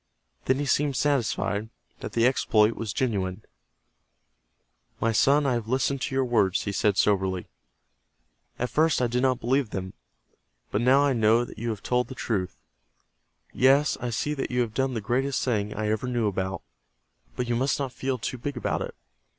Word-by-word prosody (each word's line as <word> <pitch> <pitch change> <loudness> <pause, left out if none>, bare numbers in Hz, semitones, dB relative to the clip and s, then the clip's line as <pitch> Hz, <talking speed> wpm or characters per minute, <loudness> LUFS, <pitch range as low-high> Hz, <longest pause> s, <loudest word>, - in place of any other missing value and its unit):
Then 130 - +2
he 145 - -1
seemed 140 0 +1
satisfied 115 -6 0 0.3
that - - -7
the 115 0 +3
exploit 110 -4 +3
was 110 -3 -4
genuine. 100 -5 -2 1.6
"My 115 - +1
son, 140 +6 +3
I 135 - +2
have 120 -2 -2
listened 135 +2 0
to 130 - -2
your 135 -1 +2
words," 105 -6 +2
he 100 - -2
said, 100 0 +1
soberly. 95 -3 +1 1.1
"At 125 - -2
first 160 +1 +3
I 125 - +2
did 120 +1 0
not 130 -2 +2
believe 130 0 +1
them. 95 -1 -5 0.8
But 105 - 0
now 130 +3 +5
I 140 -1 +2
know 115 +1 +3
that 110 - -11
you 115 +1 -2
have 105 -3 -4
told 125 0 +1
the 130 - -8
truth. 95 -7 -2 1.0
Yes, 135 +3 +4
I 125 - -2
see 135 +6 -1
that 135 -2 -3
you 125 0 +1
have 115 -3 -2
done 135 +1 0
the 110 - -2
greatest 130 +6 0
thing 105 -5 0
I 105 0 -1
ever 110 +3 -1
knew 120 -2 0
about, 95 -1 -2 0.7
But 125 - -2
you 120 - 0
must 130 +4 +1
not 135 -3 -3
feel 130 -1 -2
too 125 +2 -4
big 140 +2 -4
about - - -1
it. - - -5
120 Hz, 185 wpm, -26 LUFS, 105-130 Hz, 1.6 s, now